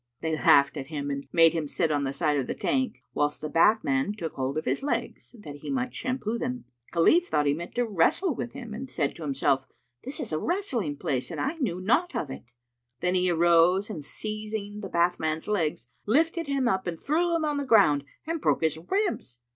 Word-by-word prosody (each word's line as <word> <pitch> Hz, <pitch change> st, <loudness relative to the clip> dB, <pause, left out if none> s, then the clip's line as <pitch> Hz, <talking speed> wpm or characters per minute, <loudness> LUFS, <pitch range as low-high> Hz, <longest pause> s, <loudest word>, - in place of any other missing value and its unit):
They 160 Hz, -1 st, -1 dB
laughed 140 Hz, -1 st, +4 dB
at 135 Hz, -2 st, -5 dB
him 145 Hz, -2 st, -4 dB
and 140 Hz, 0 st, -4 dB
made 165 Hz, -1 st, +6 dB
him 160 Hz, -3 st, -2 dB
sit 160 Hz, +2 st, 0 dB
on 145 Hz, -1 st, +1 dB
the 135 Hz, -, -1 dB
side 150 Hz, +1 st, 0 dB
of 135 Hz, -3 st, -1 dB
the -, -, -3 dB
tank, 260 Hz, -4 st, -1 dB
whilst 145 Hz, 0 st, 0 dB
the 155 Hz, -, -4 dB
bathman 165 Hz, -2 st, +3 dB
took 165 Hz, -6 st, -4 dB
hold 135 Hz, +2 st, -2 dB
of 155 Hz, -, -2 dB
his -, -, 0 dB
legs, 245 Hz, -2 st, -3 dB
that 150 Hz, -9 st, -9 dB
he 145 Hz, -, -8 dB
might 255 Hz, -2 st, -1 dB
shampoo 245 Hz, -3 st, -2 dB
them. 250 Hz, -1 st, -4 dB, 0.3 s
Khalif 325 Hz, -, +4 dB
thought 150 Hz, -, +1 dB
he 145 Hz, -, +3 dB
meant 170 Hz, +3 st, -7 dB
to 245 Hz, 0 st, +1 dB
wrestle 225 Hz, -, +2 dB
with 240 Hz, -1 st, -5 dB
him 240 Hz, -5 st, -8 dB
and 260 Hz, +5 st, -6 dB
said 150 Hz, -, -1 dB
to -, -, -11 dB
himself, 135 Hz, -2 st, 0 dB, 0.4 s
"This 270 Hz, +3 st, -5 dB
is -, -, -3 dB
a 155 Hz, -, 0 dB
wrestling 255 Hz, -, -1 dB
place[FN#292] 130 Hz, -3 st, -2 dB
and -, -, -5 dB
I 275 Hz, -, 0 dB
knew 200 Hz, -, -1 dB
naught 305 Hz, -, +1 dB
of 140 Hz, -, -2 dB
it." 120 Hz, -2 st, -10 dB, 0.5 s
Then 180 Hz, -, +1 dB
he 185 Hz, 0 st, +2 dB
arose 175 Hz, +4 st, +4 dB
and 160 Hz, -8 st, -6 dB
seizing 215 Hz, +3 st, -4 dB
the 200 Hz, -2 st, -6 dB
bathman's 170 Hz, -3 st, 0 dB
legs, 160 Hz, -, -1 dB, 0.2 s
lifted 325 Hz, -, +2 dB
him 275 Hz, -3 st, +1 dB
up 190 Hz, -5 st, 0 dB
and 165 Hz, -2 st, -3 dB
threw 335 Hz, +4 st, +1 dB
him 320 Hz, -2 st, 0 dB
on 295 Hz, -1 st, 0 dB
the 285 Hz, -, -1 dB
ground 200 Hz, -, +4 dB, 0.2 s
and 330 Hz, 0 st, -3 dB
broke -, -, +1 dB
his 160 Hz, 0 st, +1 dB
ribs. 355 Hz, -, -2 dB
180 Hz, 220 wpm, -27 LUFS, 150-255 Hz, 0.5 s, made